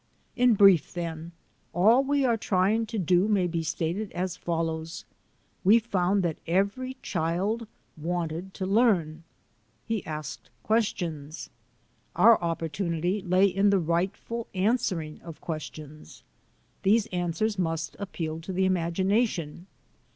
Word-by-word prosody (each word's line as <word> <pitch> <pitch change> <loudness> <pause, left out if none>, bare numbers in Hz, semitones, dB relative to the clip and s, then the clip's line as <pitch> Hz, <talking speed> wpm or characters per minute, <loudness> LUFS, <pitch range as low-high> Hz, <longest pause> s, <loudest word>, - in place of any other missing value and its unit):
In 245 -2 +4
brief, 195 -6 +5
then, 165 -1 -5 0.4
all 220 +9 +5
we 280 0 +1
are 235 -2 +3
trying 215 +2 +1
to 225 +1 -4
do 180 +1 +3
may 200 -4 +2
be 170 -1 -1
stated 170 +5 -2
as 180 0 -2
follows: 165 -1 -3 0.6
We 205 +4 +7
found 195 -4 +1
that 165 -3 -2
every 200 +9 0
child 190 +7 -1 0.3
wanted 170 +2 -4
to 190 - -3
learn. 190 -7 +2 0.6
He 225 -4 -2
asked 155 -1 -6
questions. 215 -6 +1
He 145 +3 -10
was - - -10
interested. - - -22
Our 230 -4 +7
opportunity 170 +3 -1
lay 185 +1 +3
in 195 +1 +3
the 200 - +4
rightful 190 +7 -2
answering 185 -6 0
of 165 -2 -10
questions. 155 -2 -8 0.6
These 210 +2 +3
answers 180 +4 -1
must 165 -2 -2
ap 200 -2 -6
peal 160 -1 -4
to 165 - -6
the 190 +1 +1
imagination. 185 -1 0
185 Hz, 135 wpm, -27 LUFS, 165-205 Hz, 0.6 s, We